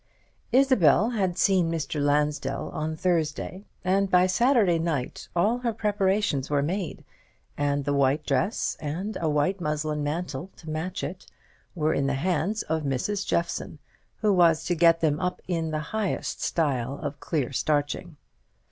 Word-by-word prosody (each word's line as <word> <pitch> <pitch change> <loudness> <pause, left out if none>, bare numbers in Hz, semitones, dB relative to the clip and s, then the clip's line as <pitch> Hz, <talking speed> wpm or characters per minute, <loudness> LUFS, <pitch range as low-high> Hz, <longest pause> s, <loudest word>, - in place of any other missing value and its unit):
Isabel 235 - +4
had 200 -6 +1
met 175 - -8
Mr. 165 -6 +1
Lansdell 145 -1 0
on 155 +1 -3
Thursday; 175 +3 -1 0.2
and 195 +1 +2
by 180 0 +5
Saturday 205 -3 +3
night 160 -6 -3
all 215 +8 +2
her 245 -2 0
preparations 200 -9 0
were 145 -1 +2
made, 180 +3 -3 0.5
and 145 -1 0
the 145 - +1
white 140 +2 +2
dress, 160 - 0
and 170 +8 -4
a 160 - +1
white 150 +6 +1
muslin 150 -1 -1
mantle 155 +1 -3
to 160 -2 -9
match 175 +5 -3
it, 180 - -6 0.5
were 155 -2 +1
in 140 - 0
the 140 - 0
hands 185 +7 0
of 160 0 -1
Mrs. 150 +9 -2
Jeffson, 170 -2 -1 0.4
who 210 -2 +3
was 165 -3 +4
to 175 - +1
get 165 0 +4
them 155 -2 +2
up 180 -1 -2
in 165 -3 -1
the 155 -1 -1
highest 215 -3 -2
style 140 -5 0
of 145 -1 -4
clear 145 -7 -2
starching. 150 +4 -1
165 Hz, 155 wpm, -26 LUFS, 145-185 Hz, 0.5 s, by